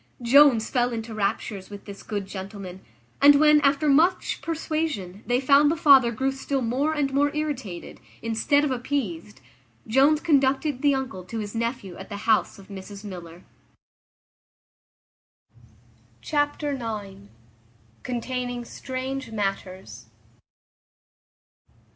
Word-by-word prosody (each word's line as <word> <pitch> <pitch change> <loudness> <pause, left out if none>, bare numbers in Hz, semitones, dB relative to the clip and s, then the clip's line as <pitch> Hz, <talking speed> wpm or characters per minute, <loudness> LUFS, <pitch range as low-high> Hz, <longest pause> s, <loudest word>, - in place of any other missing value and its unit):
Jones 245 -2 +6
fell 245 -1 0
into 225 0 -5
raptures 200 -1 -3
with 205 -1 -10
this 200 -1 -9
good 205 -2 -4
gentleman; 190 -1 -8 0.4
and 285 +1 +8
when, 300 +1 +5
after 285 +1 +2
much 325 +6 +2
persuasion, 310 - -3
they 245 +1 +2
found 280 +2 +5
the 325 - +1
father 275 -7 +6
grew 265 +4 -1
still 270 0 -3
more 260 +7 0
and 290 -3 -1
more 285 +1 +2
irritated, 265 - -4 0.2
instead 230 +6 +2
of 295 - 0
appeased, 215 - -3 0.4
Jones 275 +6 +4
conducted 275 -2 +1
the 285 -2 +3
uncle 255 -9 -4
to 225 +5 -6
his 210 -2 -5
nephew 230 -5 -3
at 190 - -10
the 205 - -5
house 220 -2 +2
of 195 -1 -15
Mrs 200 +1 -9
Miller. 175 -3 -9 2.8
Chapter 290 0 -1
ix. 210 - -6 0.7
Containing 245 0 -4
strange 260 0 -5
matters. 190 - -4
245 Hz, 120 wpm, -25 LUFS, 200-285 Hz, 2.8 s, and